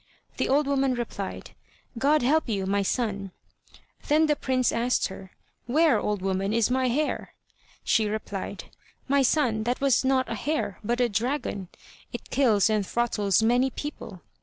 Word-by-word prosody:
The - - 0
old 285 +3 +3
woman 275 -2 +1
replied: 220 -5 -5 0.4
"God 285 +4 +2
help 300 +2 +2
you, 195 -3 -1
my 200 +1 +1
son!" 200 -1 -2 0.8
Then 310 +2 +4
the 300 -1 +2
prince 255 -3 0
asked 240 +2 0
her: 190 0 -10 0.4
"Where, 290 -2 +3
old 205 -2 -2
woman, 195 +1 -1
is 230 +1 +2
my 260 0 +2
hare?" 290 +5 -2 0.5
She 220 -2 +2
replied: 205 -2 -5 0.4
"My 280 +1 +3
son, 250 -5 +2
that 245 +1 -1
was 275 -2 +3
not 260 0 +2
a - - -3
hare, 280 - -2
but 240 +3 -1
a 245 - +3
dragon. 225 -3 -2 0.4
It - - -8
kills 220 -8 +3
and 215 -2 +1
throttles 210 -2 +1
many 245 +3 +3
people." 255 - -8
240 Hz, 160 wpm, -26 LUFS, 205-270 Hz, 0.8 s, Then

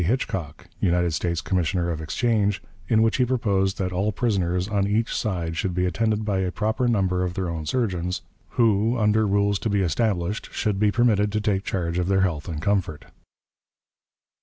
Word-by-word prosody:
Hitchcock, 90 - -2
United 85 -1 +2
States 85 +1 -1
commissioner 90 -1 0
of 80 -1 -4
exchange, 105 +3 0 0.2
in 110 +2 +4
which 115 - +2
he 130 - +3
proposed 100 -6 +1
that 90 -1 -2
all 100 +4 0
prisoners 95 -5 0
on 100 -2 0
each 110 +3 0
side 85 -7 -2
should 90 +1 -2
be 90 0 +1
attended 110 +3 0
by 100 -3 0
a 95 -1 -1
proper 110 +5 0
number 95 -5 +1
of 90 -1 -3
their 95 -2 -2
own 80 -2 -5
surgeons, 90 -6 -1 0.3
who, 115 0 +3
under 110 -1 +2
rules 100 0 +2
to 115 - -2
be 100 -1 +1
established, 95 +2 -1
should 105 -3 -1
be 105 0 +4
permitted 105 -3 +2
to 105 - +1
take 100 -2 0
charge 85 -3 -2
of 90 - 0
their 95 0 +2
health 85 -5 -1
and 80 -2 -5
comfort. 95 -7 -1
95 Hz, 185 wpm, -24 LUFS, 90-110 Hz, 0.3 s, in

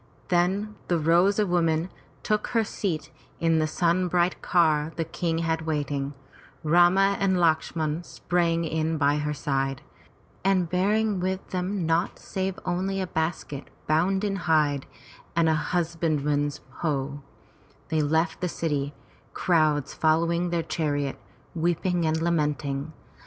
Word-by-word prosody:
Then 190 +4 +1
the 175 - +2
Rose 170 +5 +3
of 210 -2 +2
Women 165 0 +1 0.3
took 215 0 0
her 230 -2 +2
seat 190 -6 -3 0.3
in 165 -1 +3
the 155 - +1
sun 175 +3 +1
bright 175 +1 +1
car 155 -3 +2
the 165 - -1
King 165 +1 -2
had 160 -1 -1
waiting; 145 -2 -2 0.5
Rama 175 +5 +4
and 190 -2 +2
Lakshman 160 -1 +1
sprang 170 -1 0
in 160 0 -1
by 145 0 +3
her 150 0 -2
side, 135 -1 -1 0.6
and 190 -2 +2
bearing 200 +3 +1
with 185 +1 -2
them 185 0 -1
naught 165 +3 +1
save 190 -1 -3
only 190 +2 -1
a 190 - 0
basket 160 -4 -3 0.2
bound 180 +6 +2
in 200 -1 0
hide 155 -6 +1 0.5
and 165 -1 +3
a 160 - +4
husbandman's 155 -3 0 0.2
hoe, 140 -3 -2 0.7
they 160 -1 +1
left 160 +2 +1
the 180 - 0
city, 145 -4 -2 0.4
crowds 155 -5 +2
following 170 +2 +2
their 170 -1 0
chariot, 145 -3 -2 0.3
weeping 175 +1 0
and 160 +1 0
lamenting. 150 -3 -1
165 Hz, 135 wpm, -26 LUFS, 155-180 Hz, 0.7 s, Rama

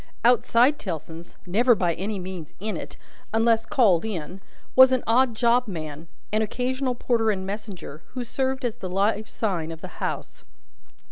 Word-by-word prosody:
Outside 245 +3 +4
Tellson's 165 -2 -7
never 230 +7 +4
by 175 -4 +1
any 200 +5 -3
means 180 -4 -7
in 215 +2 -3
it, - - -7 0.3
unless 225 0 +2
called 200 -10 +4
in 190 -3 -5 0.3
was 260 0 +9
an 255 -1 +1
odd 240 +1 +3
job 240 +1 +3
man, 155 -4 -6 0.3
an 215 - +3
occasional 250 +4 -1
porter 230 -2 +1
and 190 -3 -1
messenger, 195 -7 -7
who 250 - -2
served 265 +2 -1
as 235 -1 -2
the 190 -6 -5
live 205 +3 0
sign 175 -7 -2
of 165 0 -9
the - - -6
house. - - -4
215 Hz, 160 wpm, -25 LUFS, 180-245 Hz, 0.3 s, was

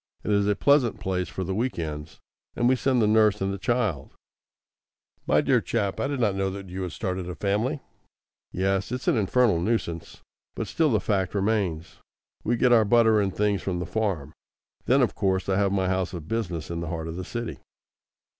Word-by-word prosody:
It - - -2
is 100 0 +2
a 105 - +2
pleasant 140 -4 +3
place 90 -2 -2
for 95 - -4
the 95 - -3
week 120 +6 -1
ends, 75 -1 -5 0.4
and 120 - +2
we 130 - +4
send 130 -2 +1
the - - +3
nurse 105 -1 +4
and 95 0 -1
the 100 - -5
child 110 - -1 0.6
" - - -48
"My 75 - +4
dear 130 -3 +3
chap, 105 -5 -2
I - - 0
did 140 -2 -3
not 105 -5 +2
know 95 0 -1
that 95 0 -7
you 95 +2 -5
had 90 -2 -3
started 90 -3 -3
a 90 - -5
family!" 110 +9 -1 0.7
"Yes, 95 +3 0
it's 125 +5 -4
an 175 - +4
infernal 110 -2 +2
nuisance; 85 -4 -2 0.3
but - - -3
still 160 -2 +1
the 110 -5 +2
fact 95 -1 -1
remains. 100 -6 -1 0.5
We 120 - +1
get 120 +1 +4
our 115 -2 +6
butter 110 0 +4
and 100 -1 0
things 105 0 0
from 90 -2 -2
the 90 - -3
farm. 90 -8 -2 0.5
Then, 130 +1 +4
of 120 - 0
course, 95 -2 0
I 95 -1 +1
have 100 -1 +2
my 95 -1 +1
house 95 0 -1
of 80 -3 -7
business 90 -9 -3
in 85 - -3
the 85 - -4
heart 80 0 -4
of 80 - -5
the 95 - -5
city." 120 +4 -5
100 Hz, 210 wpm, -26 LUFS, 90-115 Hz, 0.7 s, our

